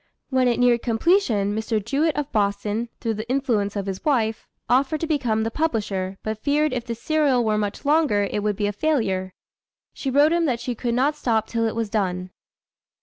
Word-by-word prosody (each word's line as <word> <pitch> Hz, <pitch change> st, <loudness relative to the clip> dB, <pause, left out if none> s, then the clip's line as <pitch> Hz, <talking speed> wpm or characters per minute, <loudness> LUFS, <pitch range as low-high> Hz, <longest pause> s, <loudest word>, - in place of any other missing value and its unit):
When 260 Hz, -1 st, +3 dB
it 240 Hz, -1 st, +1 dB
neared 245 Hz, -1 st, +4 dB
completion, 225 Hz, -, +2 dB
Mr. 220 Hz, +1 st, -1 dB
Jewett 280 Hz, +9 st, 0 dB
of 295 Hz, -1 st, -2 dB
Boston, 210 Hz, +2 st, -1 dB
through 225 Hz, -2 st, -1 dB
the 220 Hz, +2 st, -6 dB
influence 235 Hz, -7 st, 0 dB
of 200 Hz, -1 st, -2 dB
his 195 Hz, -1 st, -5 dB
wife, 225 Hz, -7 st, 0 dB, 0.2 s
offered 275 Hz, +5 st, +2 dB
to -, -, 0 dB
become 245 Hz, -9 st, 0 dB
the 225 Hz, -, -2 dB
publisher, 205 Hz, -10 st, -2 dB
but 215 Hz, 0 st, -4 dB
feared 300 Hz, 0 st, +1 dB
if 245 Hz, -2 st, -2 dB
the 230 Hz, -, -3 dB
serial 275 Hz, -1 st, +1 dB
were 215 Hz, -1 st, +2 dB
much 205 Hz, +6 st, -3 dB
longer, 285 Hz, -10 st, +3 dB
it 210 Hz, -, -1 dB
would 210 Hz, 0 st, 0 dB
be 205 Hz, -, -1 dB
a 205 Hz, -, -1 dB
failure. 200 Hz, -9 st, -1 dB, 0.6 s
She 270 Hz, -, -4 dB
wrote 290 Hz, +4 st, +4 dB
him 340 Hz, -1 st, +2 dB
that 250 Hz, -6 st, 0 dB
she 250 Hz, -, -3 dB
could 235 Hz, 0 st, -2 dB
not 280 Hz, +4 st, +2 dB
stop 225 Hz, -6 st, 0 dB
till 230 Hz, 0 st, -1 dB
it 220 Hz, -, -3 dB
was 225 Hz, -3 st, -2 dB
done. 185 Hz, -4 st, -1 dB
230 Hz, 205 wpm, -23 LUFS, 210-275 Hz, 0.6 s, neared